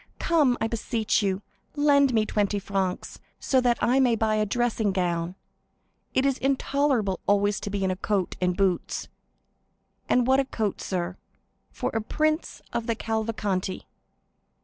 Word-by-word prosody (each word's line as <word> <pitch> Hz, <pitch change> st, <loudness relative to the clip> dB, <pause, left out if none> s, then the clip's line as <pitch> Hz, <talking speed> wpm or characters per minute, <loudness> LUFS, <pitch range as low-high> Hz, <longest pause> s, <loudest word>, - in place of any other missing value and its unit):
Come, 295 Hz, -8 st, +3 dB
I 225 Hz, -, 0 dB
beseech 225 Hz, -1 st, 0 dB
you, 195 Hz, 0 st, -1 dB, 0.3 s
lend 285 Hz, -2 st, +4 dB
me 220 Hz, -3 st, +2 dB
twenty 205 Hz, -1 st, 0 dB
francs, 195 Hz, -2 st, -3 dB, 0.2 s
so 260 Hz, -2 st, +2 dB
that 240 Hz, -2 st, +2 dB
I 255 Hz, +3 st, +4 dB
may 250 Hz, -3 st, +4 dB
buy 220 Hz, -1 st, +1 dB
a 215 Hz, 0 st, +1 dB
dressing 230 Hz, -2 st, 0 dB
gown; 175 Hz, -1 st, -1 dB, 0.8 s
it 260 Hz, -, +3 dB
is 275 Hz, -1 st, +1 dB
intolerable 270 Hz, -6 st, +1 dB
always 205 Hz, 0 st, +2 dB
to -, -, -5 dB
be 200 Hz, -1 st, -2 dB
in 190 Hz, -, +1 dB
a -, -, -1 dB
coat 195 Hz, -1 st, -1 dB
and 180 Hz, -1 st, +1 dB
boots! 190 Hz, -3 st, 0 dB, 1.0 s
And 250 Hz, -1 st, +3 dB
what 265 Hz, +1 st, +4 dB
a 275 Hz, -, +2 dB
coat, 220 Hz, -6 st, -2 dB
sir, 180 Hz, -1 st, -3 dB, 0.5 s
for -, -, -3 dB
a 225 Hz, -, 0 dB
prince 310 Hz, +8 st, -1 dB
of 235 Hz, -1 st, -2 dB
the 230 Hz, -, +1 dB
Cavalcanti!" 215 Hz, -4 st, -2 dB
220 Hz, 155 wpm, -26 LUFS, 195-250 Hz, 1.0 s, lend